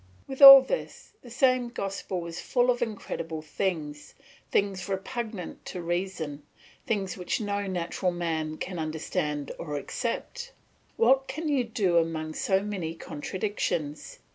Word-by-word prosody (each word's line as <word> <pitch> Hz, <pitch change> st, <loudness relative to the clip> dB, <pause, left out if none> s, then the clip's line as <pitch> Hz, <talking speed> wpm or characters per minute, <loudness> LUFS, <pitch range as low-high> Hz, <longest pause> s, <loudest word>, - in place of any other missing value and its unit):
With 270 Hz, 0 st, -7 dB
all 275 Hz, -1 st, +13 dB
this -, -, -5 dB
the 245 Hz, -, -13 dB
same 255 Hz, 0 st, +2 dB
gospel 195 Hz, -5 st, -4 dB
is 170 Hz, 0 st, -6 dB
full 245 Hz, 0 st, +2 dB
of 240 Hz, -, -3 dB
incredible 165 Hz, -8 st, -4 dB
things, 150 Hz, -3 st, -3 dB, 0.3 s
things 195 Hz, -2 st, 0 dB
repugnant 200 Hz, 0 st, -5 dB
to 180 Hz, -, -5 dB
reason, 175 Hz, -4 st, -3 dB, 0.5 s
things 195 Hz, -4 st, -1 dB
which 180 Hz, -, -2 dB
no 205 Hz, -2 st, -2 dB
natural 180 Hz, 0 st, -1 dB
man 160 Hz, -3 st, -2 dB
can 180 Hz, -2 st, -5 dB
understand 150 Hz, -2 st, -3 dB
or 150 Hz, -3 st, -4 dB
accept. 370 Hz, -, -4 dB, 0.4 s
What 265 Hz, +3 st, +4 dB
can 310 Hz, +4 st, -4 dB
you 275 Hz, -4 st, +2 dB
do 205 Hz, -6 st, +1 dB
among 160 Hz, -1 st, -2 dB
so 190 Hz, +3 st, +1 dB
many 185 Hz, -6 st, -4 dB
contradictions? 165 Hz, -2 st, -4 dB
190 Hz, 135 wpm, -27 LUFS, 165-235 Hz, 0.5 s, all